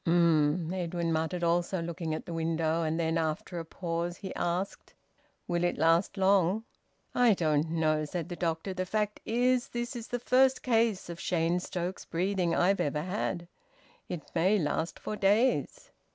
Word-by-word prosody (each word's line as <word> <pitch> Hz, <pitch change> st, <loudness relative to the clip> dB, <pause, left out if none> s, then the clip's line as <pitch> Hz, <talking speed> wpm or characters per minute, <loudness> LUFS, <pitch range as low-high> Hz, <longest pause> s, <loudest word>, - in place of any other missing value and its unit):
"Um!" 165 Hz, 0 st, +3 dB
Edwin 170 Hz, -2 st, -1 dB
muttered, 160 Hz, +2 st, -1 dB
also 175 Hz, +2 st, +1 dB
looking 165 Hz, -1 st, -3 dB
at -, -, -6 dB
the 170 Hz, -, -6 dB
window. 165 Hz, 0 st, 0 dB
And 160 Hz, 0 st, -1 dB
then, 165 Hz, 0 st, +1 dB
after 160 Hz, +2 st, -2 dB
a 165 Hz, -, -6 dB
pause, 170 Hz, +1 st, -3 dB
he 190 Hz, -, -6 dB
asked: 180 Hz, +3 st, -3 dB, 0.5 s
"Will 175 Hz, 0 st, 0 dB
it 175 Hz, -, +1 dB
last 165 Hz, +5 st, +3 dB
long?" 195 Hz, +1 st, +3 dB, 0.5 s
"I 245 Hz, -4 st, +5 dB
don't 155 Hz, -2 st, +1 dB
know," 155 Hz, -2 st, +1 dB
said 170 Hz, +2 st, -4 dB
the 175 Hz, -, -5 dB
doctor. 170 Hz, +2 st, -2 dB
"The 185 Hz, 0 st, -3 dB
fact 210 Hz, +1 st, -1 dB
is, 250 Hz, +2 st, +2 dB
this 240 Hz, +1 st, -4 dB
is 235 Hz, -1 st, -6 dB
the 245 Hz, -, -2 dB
first 260 Hz, +2 st, +3 dB
case 225 Hz, -5 st, +2 dB
of 170 Hz, -1 st, -7 dB
Cheyne 170 Hz, 0 st, +1 dB
Stokes 180 Hz, +1 st, -4 dB
breathing 180 Hz, 0 st, 0 dB
I've 195 Hz, +3 st, +3 dB
ever 150 Hz, +1 st, -1 dB
had. 180 Hz, -2 st, -3 dB, 0.6 s
It 175 Hz, -4 st, -4 dB
may 185 Hz, +5 st, +3 dB
last 160 Hz, -1 st, -1 dB
for 215 Hz, -, -5 dB
days." 210 Hz, +6 st, +1 dB
175 Hz, 165 wpm, -30 LUFS, 165-195 Hz, 0.6 s, I